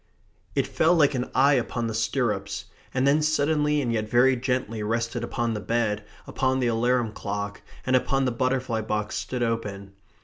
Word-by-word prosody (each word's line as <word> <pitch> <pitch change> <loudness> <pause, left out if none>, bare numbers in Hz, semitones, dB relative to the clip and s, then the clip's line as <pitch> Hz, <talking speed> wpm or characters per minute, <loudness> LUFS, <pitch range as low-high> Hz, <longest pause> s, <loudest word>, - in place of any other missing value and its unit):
It - - +2
fell 165 +3 +3
like 150 -3 +4
an 125 -1 -2
eye 140 +3 +5
upon 120 -2 0
the 115 - -2
stirrups, 110 -3 -1 0.3
and 130 +1 +1
then 145 +2 +4
suddenly 150 -1 +2
and 120 -2 -1
yet 110 -1 -1
very 125 +3 +5
gently 125 -3 -2
rested 115 +2 -1
upon 120 -1 -1
the 105 - -3
bed, 110 -1 -1 0.2
upon 130 0 0
the 125 - +1
alarum 120 0 +1
clock, 100 -1 -4 0.2
and 130 - +2
upon 135 +1 +2
the 125 - +1
butterfly 130 -2 0
box 105 -1 -2
stood 125 -1 -2
open. 105 -4 -3
120 Hz, 175 wpm, -25 LUFS, 110-130 Hz, 0.3 s, eye